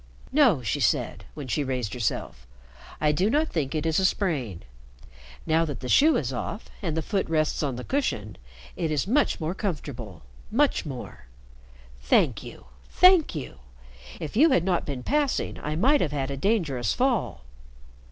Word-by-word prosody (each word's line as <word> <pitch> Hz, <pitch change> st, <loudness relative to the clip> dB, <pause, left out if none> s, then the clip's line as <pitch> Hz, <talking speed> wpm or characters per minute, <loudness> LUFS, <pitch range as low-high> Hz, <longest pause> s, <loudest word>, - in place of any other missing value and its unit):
"No," 250 Hz, -, +4 dB
she 110 Hz, -, -1 dB
said, -, -, 0 dB
when 145 Hz, -3 st, -7 dB
she 145 Hz, +4 st, 0 dB
raised 125 Hz, -6 st, -3 dB
herself, 110 Hz, -, -3 dB, 0.5 s
"I 150 Hz, -1 st, +3 dB
do 180 Hz, +7 st, +1 dB
not 305 Hz, +6 st, +1 dB
think 150 Hz, -3 st, -2 dB
it 155 Hz, 0 st, -1 dB
is 160 Hz, +1 st, +2 dB
a 190 Hz, -, +2 dB
sprain. 140 Hz, -, -1 dB, 0.8 s
Now 160 Hz, +1 st, +3 dB
that 150 Hz, -4 st, -4 dB
the 125 Hz, -, -5 dB
shoe 295 Hz, -, +5 dB
is 135 Hz, -3 st, -2 dB
off 205 Hz, -, -5 dB
and 165 Hz, -5 st, -2 dB
the 160 Hz, -, -1 dB
foot 195 Hz, -1 st, -1 dB
rests 155 Hz, -1 st, +1 dB
on 140 Hz, -4 st, -1 dB
the 125 Hz, -, -6 dB
cushion, 110 Hz, -, -2 dB, 0.4 s
it 165 Hz, -, -2 dB
is 150 Hz, -3 st, 0 dB
much 270 Hz, +8 st, +1 dB
more 160 Hz, +2 st, -2 dB
comfortable, 140 Hz, -, -5 dB, 0.3 s
much 270 Hz, -, +1 dB
more. 125 Hz, -, -8 dB, 0.7 s
Thank -, -, +2 dB
you, -, -, -11 dB, 0.2 s
thank 365 Hz, -, +5 dB
you. 130 Hz, -, -6 dB, 0.6 s
If 160 Hz, 0 st, -6 dB
you 305 Hz, +8 st, +6 dB
had 220 Hz, -, +3 dB
not 180 Hz, -2 st, 0 dB
been 135 Hz, -4 st, -4 dB
passing 290 Hz, -1 st, 0 dB
I 150 Hz, +1 st, -3 dB
might 270 Hz, -, +3 dB
have 150 Hz, -, 0 dB
had 140 Hz, -1 st, -2 dB
a -, -, -3 dB
dangerous 140 Hz, -, 0 dB
fall." 250 Hz, -, 0 dB
155 Hz, 170 wpm, -26 LUFS, 130-215 Hz, 0.8 s, you